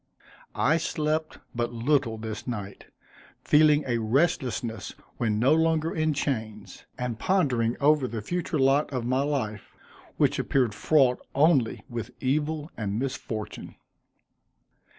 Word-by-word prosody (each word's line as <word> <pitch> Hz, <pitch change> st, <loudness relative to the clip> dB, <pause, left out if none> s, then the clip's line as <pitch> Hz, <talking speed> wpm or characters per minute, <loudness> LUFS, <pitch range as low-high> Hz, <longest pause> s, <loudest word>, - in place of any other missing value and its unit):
I 155 Hz, +5 st, +3 dB
slept 155 Hz, -1 st, -2 dB, 0.2 s
but 120 Hz, 0 st, -2 dB
little 120 Hz, -1 st, +1 dB
this 110 Hz, +1 st, -6 dB
night, 105 Hz, -5 st, -6 dB, 0.6 s
feeling 150 Hz, 0 st, +5 dB
a 120 Hz, -2 st, 0 dB
restlessness 120 Hz, -, -1 dB, 0.2 s
when 110 Hz, -3 st, 0 dB
no 130 Hz, +7 st, +4 dB
longer 160 Hz, 0 st, +2 dB
in 155 Hz, -2 st, 0 dB
chains; 110 Hz, -8 st, -4 dB
and 125 Hz, -3 st, -3 dB
pondering 125 Hz, -12 st, +1 dB
over 145 Hz, -2 st, +3 dB
the 115 Hz, -3 st, -5 dB
future 175 Hz, +2 st, -2 dB
lot 135 Hz, +2 st, +3 dB
of 125 Hz, -3 st, -3 dB
my 130 Hz, +2 st, +1 dB
life, 130 Hz, -8 st, -3 dB, 0.4 s
which -, -, +2 dB
appeared 125 Hz, -6 st, +1 dB
fraught 130 Hz, +3 st, +3 dB, 0.2 s
only 140 Hz, -5 st, +3 dB
with 115 Hz, -3 st, -5 dB
evil 150 Hz, +3 st, -1 dB
and 105 Hz, -2 st, -3 dB
misfortune. 120 Hz, -4 st, -5 dB
130 Hz, 125 wpm, -26 LUFS, 115-150 Hz, 0.6 s, feeling